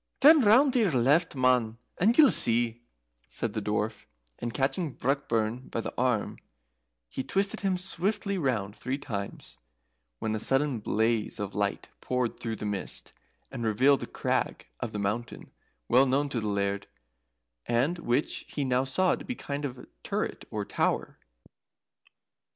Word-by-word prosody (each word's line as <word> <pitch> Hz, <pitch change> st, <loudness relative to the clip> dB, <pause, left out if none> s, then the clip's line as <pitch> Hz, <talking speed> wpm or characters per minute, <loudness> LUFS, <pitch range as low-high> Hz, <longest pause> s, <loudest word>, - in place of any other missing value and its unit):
"Turn 300 Hz, +2 st, +8 dB
roun' 250 Hz, +6 st, +6 dB
to 255 Hz, -, +2 dB
your 210 Hz, -6 st, +3 dB
left, 140 Hz, +7 st, +3 dB
man, 125 Hz, -3 st, +2 dB, 0.2 s
and 220 Hz, +6 st, +3 dB
ye'll 295 Hz, -4 st, +8 dB
see," 120 Hz, 0 st, +2 dB, 0.5 s
said -, -, -3 dB
the -, -, -2 dB
Dwarf, -, -, -2 dB, 0.3 s
and 120 Hz, -, -3 dB
catching 135 Hz, +4 st, -1 dB
Brockburn 125 Hz, -3 st, -1 dB
by -, -, -3 dB
the -, -, -4 dB
arm, 125 Hz, -4 st, 0 dB, 0.7 s
he 130 Hz, -, -4 dB
twisted 195 Hz, +6 st, 0 dB
him 190 Hz, -2 st, 0 dB
swiftly 195 Hz, +3 st, -1 dB
round 110 Hz, -, -1 dB
three 130 Hz, +2 st, -3 dB
times, 100 Hz, -8 st, -6 dB, 0.6 s
when 110 Hz, -, -2 dB
a 110 Hz, -, -1 dB
sudden 135 Hz, +1 st, +1 dB
blaze 110 Hz, +1 st, 0 dB
of 100 Hz, -1 st, -4 dB
light 100 Hz, -1 st, -2 dB
poured 125 Hz, -2 st, -1 dB
through 115 Hz, -1 st, -3 dB
the 105 Hz, -, -6 dB
mist, 100 Hz, -2 st, -4 dB, 0.4 s
and 125 Hz, -3 st, -5 dB
revealed 130 Hz, +6 st, +3 dB
a -, -, -5 dB
crag -, -, -2 dB
of 120 Hz, -, -4 dB
the 105 Hz, -, -4 dB
mountain 105 Hz, +4 st, -3 dB, 0.4 s
well 130 Hz, +2 st, +5 dB
known 140 Hz, +3 st, +1 dB
to 125 Hz, -, -2 dB
the 110 Hz, -, -3 dB
Laird, 100 Hz, 0 st, -1 dB, 0.8 s
and 135 Hz, +9 st, +1 dB
which 135 Hz, -2 st, 0 dB
he 145 Hz, -, -3 dB
now 130 Hz, 0 st, +2 dB
saw 180 Hz, +8 st, +2 dB
to -, -, -5 dB
be 255 Hz, -, -4 dB
a -, -, -23 dB
kind 145 Hz, +1 st, -4 dB
of 125 Hz, -2 st, -6 dB, 0.2 s
turret, -, -, -3 dB
or -, -, -3 dB
tower. -, -, -1 dB
125 Hz, 160 wpm, -28 LUFS, 110-150 Hz, 0.8 s, Turn